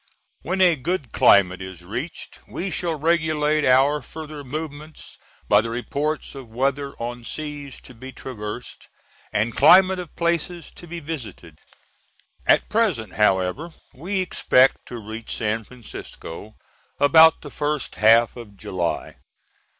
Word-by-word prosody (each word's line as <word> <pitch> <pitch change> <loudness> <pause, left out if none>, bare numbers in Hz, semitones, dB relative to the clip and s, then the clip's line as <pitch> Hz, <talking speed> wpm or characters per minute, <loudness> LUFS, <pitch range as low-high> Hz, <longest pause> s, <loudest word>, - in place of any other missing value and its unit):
When 185 +6 -2
a 180 -3 +6
good 150 -2 -3
climate 95 -2 +4
is 95 -2 -9
reached 120 - -6
we 185 +1 -4
shall 170 -3 -1
regulate 155 -1 +1
our 135 +3 +4
further 155 +2 -9
movements 150 +2 -7 0.3
by 105 0 +5
the 115 - -5
reports 140 +6 -3
of 135 -4 -10
weather 140 +4 -1
on 120 +1 -5
seas 145 +1 -6
to - - -14
be 130 +3 -10
traversed, 120 -2 -7 0.4
and 105 +2 0
climate 185 +5 +6
of 175 -4 -8
places 170 0 -2
to 175 - -11
be 170 +1 -6
visited. 115 - -8 0.9
At - - +4
present, 190 - 0
however, 105 - +1 0.2
we 185 +8 -2
expect 135 -7 +3
to 120 - -7
reach 110 +1 -6
San 110 0 -1
Francisco 110 -4 -10 0.4
about 160 +3 +6
the 145 - -9
first 150 -1 -2
half 115 +2 +5
of 110 -5 -11
July. 90 -3 -3
140 Hz, 135 wpm, -23 LUFS, 115-160 Hz, 0.9 s, a